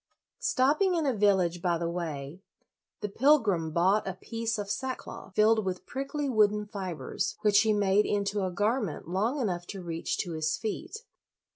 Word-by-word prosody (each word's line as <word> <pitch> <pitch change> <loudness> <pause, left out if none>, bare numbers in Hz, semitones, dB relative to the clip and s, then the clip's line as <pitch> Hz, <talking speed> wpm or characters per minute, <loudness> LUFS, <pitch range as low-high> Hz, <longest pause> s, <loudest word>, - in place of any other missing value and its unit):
Stopping 305 +9 +2
in 325 -3 0
a 270 - +2
village 190 -5 +2
by 175 -1 +1
the 170 0 -2
way, 165 -2 -5 0.6
the 210 - -1
pilgrim 210 - +3
bought 190 +6 +2
a 190 - -3
piece 225 +3 -3
of 205 -1 -4
sackcloth, 210 -3 -5
filled 220 +1 +4
with 185 -1 -4
prickly 275 +2 -3
wooden 210 -4 +3
fibers, 190 -6 -4
which 205 -1 +5
he 220 - +3
made 205 0 +3
into 200 0 0
a 185 - 0
garment 205 - -1
long 215 - 0
enough 180 -8 -2
to 195 -3 -7
reach 165 -1 -3
to 175 - -3
his 155 -1 -1
feet. 345 - -5
205 Hz, 165 wpm, -29 LUFS, 180-225 Hz, 0.6 s, which